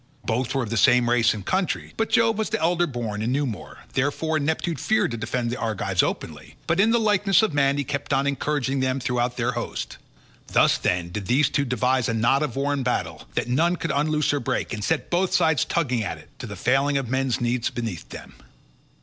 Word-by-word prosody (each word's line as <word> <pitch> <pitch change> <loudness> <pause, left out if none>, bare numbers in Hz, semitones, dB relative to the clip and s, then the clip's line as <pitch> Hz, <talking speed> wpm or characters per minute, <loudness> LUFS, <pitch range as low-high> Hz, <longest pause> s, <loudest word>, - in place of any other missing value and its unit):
Both 125 +3 -1
were 135 - +1
of 110 - -6
the 115 - 0
same 120 +2 +5
race 120 -2 +4
and 100 -3 -8
country, 185 -1 -1
but 225 - -1
Jove 225 -1 +3
was 220 - -1
elder 175 +2 +1
born 115 -6 -4
and 115 +3 -1
knew 145 +2 +1
more, 110 -7 -7
therefore 155 +4 0
Neptune 160 +2 -1
feared 220 - +1
to 115 - -3
defend 120 +1 -2
the 125 - -4
Argives 100 -4 0
openly, - - -4
but 170 +2 0
in 215 +3 +5
the 235 +1 +3
likeness 210 -1 +3
of 215 - 0
man, 140 -1 +2
he 145 - 0
kept 140 0 -4
on 135 - +2
encouraging 140 -1 -1
them 130 +1 0
throughout 125 -1 -1
their 125 0 0
host. 120 -1 -5 0.5
Thus, - - +3
then, 90 -1 -1
did 100 +1 -5
these 135 +3 +3
two 140 - +1
devise 125 0 +1
a 115 - 0
knot 115 +5 +2
of 150 -6 -2
war 140 +1 0
and 140 -2 -1
battle, 85 -10 -2
that - - -1
none 165 +8 +2
could 165 -3 -3
unloose 150 +1 +1
or 145 - +1
break, 120 - -2
and 105 -2 -4
set 160 +7 -1
both 180 +1 +1
sides 160 -5 +3
tugging 130 -9 0
at - - -4
it, - - -16
to - - -6
the - - -7
failing 140 +3 +2
of 135 -3 -2
men's 130 0 0
knees 120 0 0
beneath 115 -8 -5
them. - - -10
135 Hz, 225 wpm, -24 LUFS, 120-155 Hz, 0.5 s, same